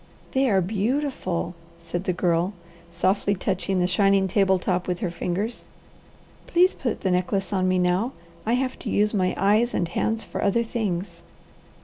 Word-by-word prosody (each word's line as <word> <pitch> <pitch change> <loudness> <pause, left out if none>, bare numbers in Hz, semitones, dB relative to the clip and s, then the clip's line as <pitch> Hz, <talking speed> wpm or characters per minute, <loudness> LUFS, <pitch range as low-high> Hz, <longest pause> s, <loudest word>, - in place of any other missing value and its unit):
"They 265 0 +2
are 195 -3 +3
beautiful," 205 - -1 0.3
said 175 +2 -5
the - - +1
Girl, 175 +1 +1 0.4
softly 190 +4 +1
touching 190 0 -1
the 180 - +3
shining 195 +1 +3
table 190 0 +3
top 180 0 -1
with 180 -1 -1
her 180 -5 -1
fingers. 185 +7 -3 0.8
"Please 360 +2 +4
put 240 -4 -3
the 190 - +1
necklace 180 +2 0
on 185 -1 +1
me 185 0 +2
now, 180 +7 +1 0.3
I 225 - 0
have 255 +1 -1
to - - -5
use 210 +1 +2
my 185 -3 +1
eyes 215 +5 +3
and 175 - +1
hands 220 +6 -1
for - - -5
other 205 +4 +2
things." 190 -7 -3
195 Hz, 165 wpm, -25 LUFS, 180-220 Hz, 0.8 s, Please